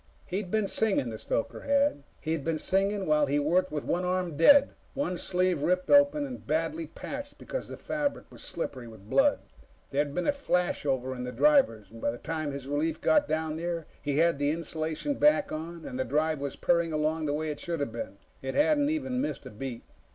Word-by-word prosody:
He'd 190 0 -3
been 215 +1 +1
singing, 195 - +1
the 110 - -6
stoker 115 - -2
had. 280 - +2 0.2
He'd 160 -2 -2
been 160 +1 0
singing 195 +4 +1
while 150 -2 +3
he 140 +2 +1
worked 170 +5 +2
with 150 -1 -3
one 180 - 0
arm 180 -3 -1
dead, 280 - +6 0.2
one 275 -10 -1
sleeve 180 -2 0
ripped 180 +3 +1
open 285 +1 +5
and 255 -2 -8
badly 160 +1 -1
patched 285 - -7
because - - -5
the - - -8
fabric 295 -2 -3
was - - -12
slippery 125 -3 -5
with 110 -3 -13
blood. 285 +1 +4 0.5
There'd 145 0 0
been 180 - 0
a - - +4
flashover 145 - 0
in 125 - -5
the 125 - -4
drivers. 260 - +3
By 115 0 -2
the 115 - -4
time 155 +1 -3
his 140 -1 -6
relief 150 +3 -1
got 300 -1 +3
down 155 0 -1
there, 170 -1 -3 0.2
he 145 -1 -1
had 165 -2 +3
the 145 0 +2
insulation 160 - -2
back 295 -1 +4
on, 165 +2 -6
and 125 - -5
the - - +2
drive 150 +4 0
was 140 0 -4
purring 170 -1 +2
along 155 +1 0
the 145 - 0
way 155 0 -2
it 145 - -6
should 170 -2 -3
have 140 -5 -2
been. 110 -3 -6 0.2
It 135 0 -4
hadn't 295 -1 +3
even 265 -5 -1
missed 290 - -3
a - - -8
beat. 120 +2 -6
165 Hz, 205 wpm, -29 LUFS, 145-210 Hz, 0.5 s, dead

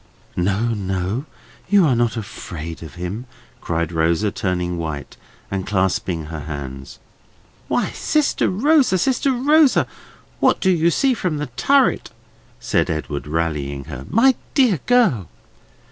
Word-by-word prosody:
"No, 100 +6 0
no! 95 +5 -2 0.4
you 200 -3 +5
are 135 -5 +3
not 120 -2 +1
afraid 85 -6 -7
of 80 - -10
him!" 95 +8 -5 0.3
cried 85 0 -2
Rosa, 85 +5 +1
turning 90 -3 -2
white, 75 -4 -5 0.4
and 95 -1 -3
clasping 95 -4 0
her 80 0 -6
hands. 70 -3 -7 0.7
"Why, - - 0
sister 305 -2 +1
Rosa, 265 +1 +3
sister 265 +7 +1
Rosa, 285 +3 +4 0.5
what - - +3
do 190 - +3
you 170 -1 +3
see 265 - +2
from 180 -9 -2
the 145 -3 -4
turret?" 275 - +3 0.5
said - - 0
Edwin, 75 -2 -3
rallying 75 -3 -2
her. 65 -2 -8
"My 260 +5 +5 0.2
dear 245 - +4
girl!" 210 - +3
100 Hz, 130 wpm, -21 LUFS, -, 0.7 s, you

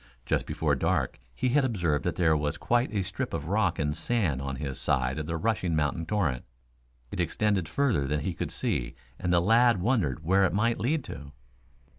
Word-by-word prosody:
Just - - 0
before - - 0
dark - - 0 0.2
he 125 - 0
had 140 +3 +3
observed 85 - 0
that 90 - 0
there 80 -3 +3
was 75 0 -1
quite 120 +2 +1
a 100 -3 0
strip 95 +1 -3
of - - -4
rock - - +1
and 75 0 -1
sand 85 - 0
on 70 -1 -3
his 65 0 -5
side 65 +4 0
of 75 - -4
the 80 0 -2
rushing 95 -3 0
mountain 80 +2 -1
torrent. 80 -12 0 0.7
It - - -5
extended 95 0 0
further 115 - +1
than 75 +1 0
he 90 +5 -2
could - - -4
see - - -2 0.2
and 90 - -1
the 90 - +5
lad 115 +3 +4
wondered 90 - 0
where 95 +4 +3
it 90 -3 +2
might 115 +4 +1
lead 140 +7 0
to. 70 - -9
90 Hz, 200 wpm, -28 LUFS, 75-110 Hz, 0.7 s, the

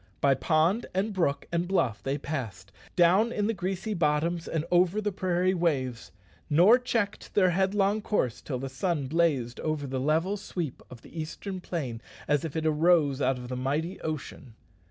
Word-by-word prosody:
By 140 -1 +4
pond, 160 - +1
and 200 +3 0
brook, 165 -7 0
and 170 +1 0
bluff 130 - 0
they 135 +1 -1
passed, 110 - -5 0.2
down 185 +7 +4
in 205 -3 -1
the 225 - +1
grassy 195 +2 -3
bottoms 165 0 0
and 160 -1 -2
over 180 +3 +3
the 210 -1 -1
prairie 185 -1 +1
waves 135 -9 -1 0.4
nor 185 +11 +6
checked 230 -5 -2
their 185 -3 +4
headlong 195 +3 +1
course 125 - -1
till 130 - -4
the 135 +2 -4
sun 140 +3 -1
blazed 140 -6 0
over 155 -2 -2
the 130 -1 -3
level 160 +9 +1
sweep 175 -8 -5
of 120 -2 -12
the 165 - -6
eastern 185 +4 -6
plain 130 -11 -4 0.3
as 145 -1 +2
if 160 -2 -5
it 160 -1 -1
arose 155 -3 +3
out 135 -1 +2
of 125 0 -8
the 125 - -4
mighty 145 +8 -2
ocean. 140 -6 -6
165 Hz, 175 wpm, -28 LUFS, 140-190 Hz, 0.4 s, nor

